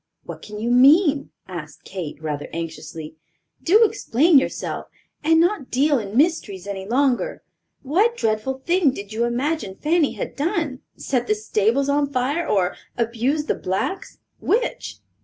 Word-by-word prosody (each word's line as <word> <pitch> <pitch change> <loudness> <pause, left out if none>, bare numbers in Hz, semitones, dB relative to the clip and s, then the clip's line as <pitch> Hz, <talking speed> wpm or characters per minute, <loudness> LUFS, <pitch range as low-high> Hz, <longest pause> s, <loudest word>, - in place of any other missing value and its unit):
"What - - -9
can 210 0 -9
you 230 +3 -1
mean?" 285 +3 +5 0.2
asked 155 -5 -8
Kate, 175 -7 -6
rather 150 -2 -3
anxiously. 160 -1 -7 0.4
"Do 420 +7 +5
explain 310 - +4
yourself, - - -4 0.4
and 325 +1 +4
not 345 -5 +1
deal 280 +2 +2
in 210 +1 -5
mysteries 260 - +1
any 195 -1 -5
longer. 255 +2 0 0.4
What 405 - +2
dreadful 225 +5 -1
thing 350 -3 +3
did 200 +1 -8
you 230 +2 +1
imagine 245 -3 -2
Fanny 310 - +1
had - - -5
done—set 285 - -2
the 215 - +2
stables 220 +5 +1
on 285 0 +1
fire, 280 +6 -1
or 185 -3 +1 0.2
abused 245 +6 0
the - - +2
blacks—which?" 395 - -3
260 Hz, 140 wpm, -22 LUFS, 205-310 Hz, 0.4 s, mean